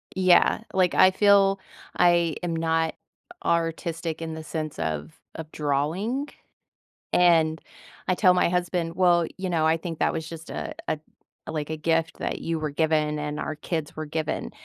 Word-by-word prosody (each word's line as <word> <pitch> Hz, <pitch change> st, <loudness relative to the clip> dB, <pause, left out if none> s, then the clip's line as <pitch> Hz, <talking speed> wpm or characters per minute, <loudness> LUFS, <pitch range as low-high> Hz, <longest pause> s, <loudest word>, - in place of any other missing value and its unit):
Yeah, 185 Hz, +2 st, +4 dB
like, 185 Hz, -2 st, +2 dB
I 185 Hz, -, +7 dB
feel 195 Hz, 0 st, +4 dB, 0.4 s
I 170 Hz, -3 st, +4 dB
am 170 Hz, -1 st, -1 dB
not 160 Hz, 0 st, 0 dB, 0.5 s
artistic 165 Hz, -1 st, -1 dB
in 160 Hz, -1 st, -4 dB
the 160 Hz, 0 st, -7 dB
sense 155 Hz, -1 st, -5 dB
of 80 Hz, -1 st, -3 dB, 0.2 s
of 160 Hz, -1 st, -8 dB
drawing. 165 Hz, -, -1 dB, 0.9 s
And 165 Hz, -3 st, +4 dB, 0.5 s
I 185 Hz, -, +3 dB
tell 180 Hz, -1 st, +5 dB
my 180 Hz, -, +3 dB
husband, 175 Hz, -1 st, -1 dB
"Well, 175 Hz, -2 st, +4 dB
you 185 Hz, 0 st, -3 dB
know, 160 Hz, -2 st, +1 dB
I 160 Hz, -, +4 dB
think 165 Hz, -1 st, -6 dB
that -, -, +2 dB
was 160 Hz, 0 st, -4 dB
just 165 Hz, 0 st, -9 dB
a -, -, -5 dB
a 155 Hz, -, 0 dB, 0.5 s
like, 155 Hz, -1 st, -4 dB
a 160 Hz, -, -2 dB
gift 165 Hz, +1 st, 0 dB
that -, -, -3 dB
you 165 Hz, -1 st, -2 dB
were 155 Hz, -, -2 dB
given 150 Hz, 0 st, +1 dB
and 150 Hz, 0 st, -3 dB
our 155 Hz, -, -4 dB
kids 160 Hz, -1 st, -4 dB
were 155 Hz, -1 st, -4 dB
given." 155 Hz, 0 st, -3 dB
165 Hz, 170 wpm, -25 LUFS, 155-175 Hz, 0.9 s, I